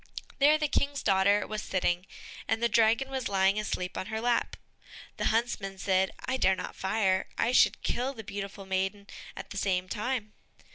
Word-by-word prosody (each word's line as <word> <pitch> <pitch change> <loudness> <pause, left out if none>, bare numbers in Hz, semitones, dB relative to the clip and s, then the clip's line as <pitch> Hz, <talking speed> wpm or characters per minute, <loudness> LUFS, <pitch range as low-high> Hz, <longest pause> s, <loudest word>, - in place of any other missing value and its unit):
There 295 +2 +6
the 305 -1 0
King's 280 0 -1
daughter 200 +1 +3
was 215 0 -4
sitting, 180 -1 -1 0.4
and 225 - +1
the - - +5
dragon 230 +4 +3
was 260 -2 -2
lying 195 +1 +3
asleep 180 -3 -3
on 185 - -5
her 220 0 -3
lap. 240 +1 0 0.6
The - - -2
huntsman 215 -4 0
said, 190 0 +2 0.2
"I 260 - 0
dare 190 -6 +3
not 180 - -6
fire, 190 -1 +1
I 235 - +2
should 250 - +4
kill 260 +3 -1
the 220 - -8
beautiful 200 -1 -6
maiden 190 +1 -2 0.3
at - - -8
the 200 - -6
same 185 -2 0
time." 215 0 -3
210 Hz, 180 wpm, -29 LUFS, 190-235 Hz, 0.6 s, There